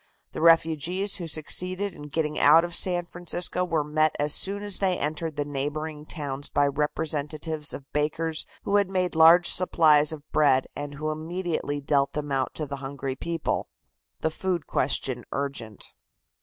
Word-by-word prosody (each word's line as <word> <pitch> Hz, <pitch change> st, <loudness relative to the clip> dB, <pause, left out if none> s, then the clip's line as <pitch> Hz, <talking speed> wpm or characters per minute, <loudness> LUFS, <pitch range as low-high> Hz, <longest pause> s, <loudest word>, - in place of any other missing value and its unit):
The -, -, -6 dB
refugees 165 Hz, +4 st, +3 dB
who 175 Hz, -3 st, -5 dB
succeeded 180 Hz, +5 st, -1 dB
in 150 Hz, -, -10 dB
getting 150 Hz, +1 st, -1 dB
out 160 Hz, +4 st, +6 dB
of 175 Hz, -, -7 dB
San 175 Hz, 0 st, +3 dB
Francisco 175 Hz, +1 st, -2 dB
were 165 Hz, -4 st, 0 dB
met 155 Hz, +1 st, +1 dB
as 145 Hz, 0 st, +1 dB
soon 200 Hz, +1 st, 0 dB
as 205 Hz, -2 st, +3 dB
they 190 Hz, -2 st, +1 dB
entered 155 Hz, +1 st, -3 dB
the 145 Hz, -1 st, -2 dB
neighboring 150 Hz, +2 st, -4 dB
towns 145 Hz, -3 st, -5 dB
by 145 Hz, 0 st, +2 dB
representatives 150 Hz, +1 st, -1 dB
of 140 Hz, -, -7 dB
bakers 155 Hz, +2 st, 0 dB, 0.2 s
who 205 Hz, -, +2 dB
had 200 Hz, -2 st, +1 dB
made 185 Hz, -2 st, -1 dB
large 165 Hz, +2 st, +7 dB
supplies 155 Hz, -4 st, +4 dB
of 150 Hz, -1 st, -8 dB
bread, 135 Hz, -4 st, +3 dB
and 145 Hz, 0 st, -6 dB
who 155 Hz, +1 st, -3 dB
immediately 160 Hz, -2 st, -3 dB
dealt 140 Hz, -1 st, +1 dB
them 145 Hz, -1 st, -4 dB
out 135 Hz, -1 st, -1 dB
to 155 Hz, -, -3 dB
the 140 Hz, -1 st, -6 dB
hungry 135 Hz, -1 st, -5 dB
people. 165 Hz, +3 st, -3 dB, 0.5 s
THE 160 Hz, -, 0 dB
FOOD 175 Hz, -1 st, -2 dB
QUESTION 130 Hz, -2 st, -1 dB
URGENT. 135 Hz, -7 st, -5 dB
155 Hz, 165 wpm, -26 LUFS, 145-170 Hz, 0.5 s, large